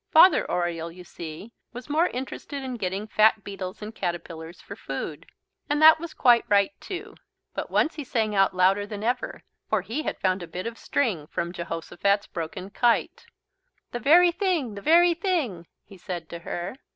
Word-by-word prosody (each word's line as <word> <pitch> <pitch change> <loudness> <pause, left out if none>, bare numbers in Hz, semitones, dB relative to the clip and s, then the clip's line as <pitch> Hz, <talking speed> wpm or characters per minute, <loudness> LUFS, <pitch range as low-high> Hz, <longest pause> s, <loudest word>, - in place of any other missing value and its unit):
Father 345 +4 +6
Oriole, 170 -1 -1
you 180 +1 -12
see, 170 +5 -9 0.2
was 245 +1 -8
more 315 +4 +3
interested 270 +2 -6
in 260 -1 -4
getting 195 0 -3
fat 215 0 +3
beetles 195 0 -6
and 215 +1 -7
caterpillars 170 -3 -5
for - - -10
food. - - -6 0.4
And 295 0 +1
that 315 +1 +8
was 330 -1 -7
quite 240 -2 +5
right 200 +6 +4
too. 370 - -6 0.4
But - - -4
once 315 - +2
he 300 - -6
sang 220 -4 -1
out 195 -1 +3
louder 195 +3 +3
than 205 0 -6
ever, 245 +2 -2 0.3
for - - +1
he 255 +8 -3
had - - -3
found 185 0 0
a 175 - -6
bit 180 +2 -6
of 230 0 -5
string 200 - -1
from 170 +2 -3
Jehosophat's 175 +4 -1
broken 170 +3 -6
kite. 240 +1 +1 0.6
"The 240 - -3
very 345 +8 +6
thing, 340 - 0
the 200 - -8
very 340 - +5
thing," 315 - -2 0.2
he 195 - -15
said 175 -2 -6
to 170 - -7
her. 175 +6 -5
210 Hz, 180 wpm, -26 LUFS, 180-275 Hz, 0.6 s, that